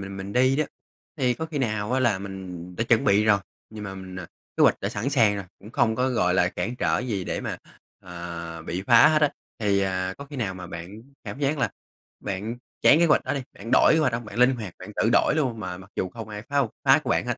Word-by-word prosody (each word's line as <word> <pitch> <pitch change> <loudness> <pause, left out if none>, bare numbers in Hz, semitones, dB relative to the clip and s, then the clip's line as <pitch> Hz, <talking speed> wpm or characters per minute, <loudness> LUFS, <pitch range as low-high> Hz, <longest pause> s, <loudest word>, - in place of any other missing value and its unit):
mình 95 0 -7
mình 95 +1 -6
đi 130 +2 +3
đó, 155 - +2 0.5
thì 125 -3 +1
có 160 - -4
khi 155 -2 -4
nào 110 -3 -1
á 130 - +2
là 120 -6 +2
mình 95 -2 -8
đã 115 - 0
chuẩn 115 -1 +3
bị 100 +1 +4
rồi, 105 -2 +5 0.3
nhưng 110 -1 -8
mà 95 -1 -6
mình 95 -1 -9
à, 90 -2 -6 0.3
kế - - +3
hoạch - - +4
đã - - -1
sẵn 115 +7 -2
sàng 115 -7 +3
rồi, 100 - -5
cũng 105 - -13
không 115 -1 +2
có, 125 +3 +1
gọi 90 -8 +1
là, 90 -1 +3
cản 110 +8 -4
trở - - +1
gì 110 -7 -2
để - - -3
mà, - - -4 0.4
à, 85 -2 -7
bị 85 +3 -4
phá 120 +4 +8
hết 155 -1 +2
á, 150 - +6 0.3
thì, 100 -3 +2
à, 95 -1 -1
có 140 - -7
khi 145 0 -10
nào 105 -7 -2
mà 90 -1 -8
bạn 90 +5 -8 0.2
cảm - - -6
giác 145 +1 0
là 120 -7 +1 0.5
bạn 105 +5 -4 0.3
chán 150 - +7
kế 170 - +5
hoạch 150 - +3
đó - - -1
đi, 140 - -2
bạn 115 +4 -9
đổi - - +6
kế 160 - +4
hoạch 135 -6 +2
hông? 115 0 -3
Bạn 110 - -8
linh 125 +2 +5
hoạt, 105 -6 -7
bạn - - -9
tự 115 - +2
đổi 130 - +4
luôn 125 -8 0
mà 90 -2 -5
mặc 95 +1 -14
dù 95 - -1
không 115 +2 -8
ai 105 -1 -7
phá 145 - -3
hông 135 -5 +2 0.2
phá - - +7
của - - -2
bạn - - +1
hết, - - -1
105 Hz, 275 wpm, -25 LUFS, 95-125 Hz, 0.5 s, phá